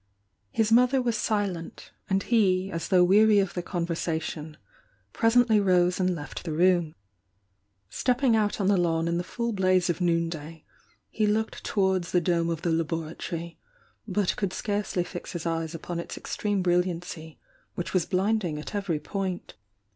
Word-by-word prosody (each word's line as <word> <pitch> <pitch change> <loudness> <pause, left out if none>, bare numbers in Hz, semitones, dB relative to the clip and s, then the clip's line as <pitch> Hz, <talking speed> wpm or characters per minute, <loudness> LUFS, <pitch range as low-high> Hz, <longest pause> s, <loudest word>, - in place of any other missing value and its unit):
His 220 - 0
mother 250 +3 +5
was 240 -3 0
silent, 200 -7 -2 0.2
and 195 0 +1
he, 195 -5 +2
as 165 0 -3
though 180 -1 +5
weary 210 +3 +5
of 195 -3 +1
the 175 - -2
conversation, 165 -3 -3 0.6
presently 230 -1 +4
rose 180 -2 +3
and 185 -1 +1
left 145 -3 -7
the 165 - -4
room. 175 -1 +2 0.9
Stepping 250 - +1
out 210 -1 +1
on 195 - +1
the 200 -1 +4
lawn 165 -2 +1
in 170 0 0
the - - -2
full 235 +6 -3
blaze 185 -2 +2
of 175 - -6
noon 170 -1 +2
day, 160 -1 -8 0.5
he 215 -1 +1
looked 220 +1 -1
towards 190 -3 0
the 180 - +5
dome 170 -1 +1
of 165 -1 -3
the 170 - +1
laboratory, 165 +1 -3 0.5
but 200 -2 0
could 195 -3 -2
scarcely 205 -3 -1
fix 175 0 -8
his 175 -2 -5
eyes 165 -1 -2
upon 170 +1 -5
its 170 - -6
extreme 205 -3 -2
bril 175 0 +4
liancy, 165 -3 -7 0.4
which 175 - -4
was 180 -3 +1
blinding 190 -4 0
at 150 - -7
every 195 -7 -1
point. 190 +3 -4
180 Hz, 165 wpm, -27 LUFS, 170-205 Hz, 0.9 s, mother